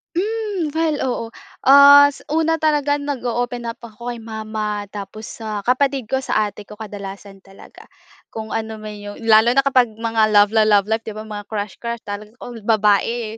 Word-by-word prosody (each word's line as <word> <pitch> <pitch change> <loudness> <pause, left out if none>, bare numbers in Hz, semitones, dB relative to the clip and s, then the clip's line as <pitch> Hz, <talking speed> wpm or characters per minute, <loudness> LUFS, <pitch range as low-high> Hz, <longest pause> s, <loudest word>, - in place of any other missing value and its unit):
Hmm, 410 -3 -2
well, 320 -2 +1
oo. 240 -2 -2 0.4
As 285 +1 +8
una 325 +1 +1
talaga 290 -2 +1
nag-o-open 245 -4 -3
up 230 0 -6
ako 235 +1 -8
kay 235 - -7
mama, 215 -2 -4
tapos 205 +1 -8 0.2
sa 215 -2 -5
kapatid 265 +3 +1
ko, 265 - +1
sa 215 -5 0
ate 205 +1 -13
ko, 210 - -11
kadalasan 200 -2 -9
talaga. 195 0 -16 0.4
Kung 220 -1 -8
ano 220 0 -3
man 215 0 -8
iyon 205 +1 -9
lalo 225 +2 +5
na 275 - +4
kapag 260 -3 +3
mga 225 -1 +1
love-la-love 205 -1 +4
life 225 +1 0
'di 215 - -6
ba 215 - -6
mga 205 -1 -7
crush, 205 -2 -4
crush 235 -1 -5
talaga 210 +1 -7
all 240 -2 -8
babae, 215 +1 +1
225 Hz, 170 wpm, -20 LUFS, 210-265 Hz, 0.4 s, As